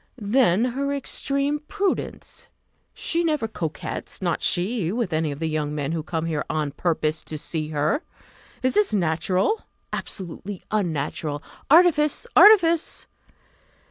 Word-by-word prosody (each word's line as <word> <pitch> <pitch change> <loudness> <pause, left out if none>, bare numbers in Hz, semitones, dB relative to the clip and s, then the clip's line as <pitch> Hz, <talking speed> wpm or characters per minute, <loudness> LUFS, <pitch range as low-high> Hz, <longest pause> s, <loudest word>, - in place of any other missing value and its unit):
Then 220 -2 +3
her 275 +3 -1
extreme 280 +1 -1
prudence! 400 -2 -3 0.5
She 340 +1 0
never 300 -8 0
coquets, 165 -7 -5
not 175 -3 -1
she, 180 -1 +2
with 230 -4 -2
any 155 -1 0
of 140 - -6
the 160 - -3
young 150 -1 -2
men 145 0 -2
who 165 -1 -1
come 160 0 -3
here 155 -3 -1
on 155 -2 -1
purpose 155 0 -1
to 155 - -5
see 155 +1 -3
her. 155 - 0 0.6
Is 255 - +2
this 415 - +2
natural? 185 - +1 0.3
Absolutely 190 +1 -6
unnatural 155 -6 -2 0.3
artifice! 310 - +5
artifice! 340 -6 +6
185 Hz, 130 wpm, -24 LUFS, -, 0.6 s, artifice